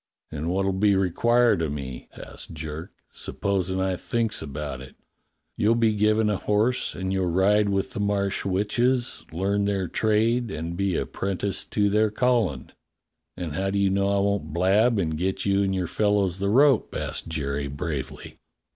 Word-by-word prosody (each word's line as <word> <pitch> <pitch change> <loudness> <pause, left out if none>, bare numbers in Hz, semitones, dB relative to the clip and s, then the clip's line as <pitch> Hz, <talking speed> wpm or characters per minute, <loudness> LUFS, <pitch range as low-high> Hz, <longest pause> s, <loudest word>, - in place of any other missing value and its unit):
and 80 +2 -3
what'll 95 +1 0
be 100 +1 +3
required 110 +3 +3
o' 80 - 0
me?" 65 -3 -6
asked - - -10
Jerk, 80 +2 -6 0.2
"supposin' 95 -1 -2
I 95 0 0
thinks 115 +3 -2
about 75 -3 -5
it." 65 - -12 0.6
"You'll 110 +2 +3
be 115 -2 +3
given 105 +1 +2
a 105 -2 +1
horse, 110 +6 0
and 95 0 -3
you'll 95 -1 0
ride 100 +4 +3
with 100 -1 -1
the - - -4
Marsh 100 -1 0
witches, 120 +6 0
learn 100 +4 0
their 100 -2 0
trade, 110 +5 +1
and 80 +1 -4
be 95 -1 0
apprenticed 100 0 -3
to 105 -1 +3
their 105 +1 +3
callin'." 110 - 0 0.7
"And 85 -4 -4
how 95 +4 -1
do 100 - -1
you 100 -1 +2
know 100 0 +1
I 100 0 +2
won't 100 -7 -1
blab 100 +7 +3
and 80 -5 0
get 95 +1 -1
you 100 0 +2
and 95 -1 0
your 90 -1 -1
fellows 100 -1 +1
the 100 0 0
rope.^^" 135 +1 +3
asked - - -4
Jerry 70 -3 -2
bravely. 70 -1 -5
100 Hz, 170 wpm, -25 LUFS, 85-105 Hz, 0.7 s, be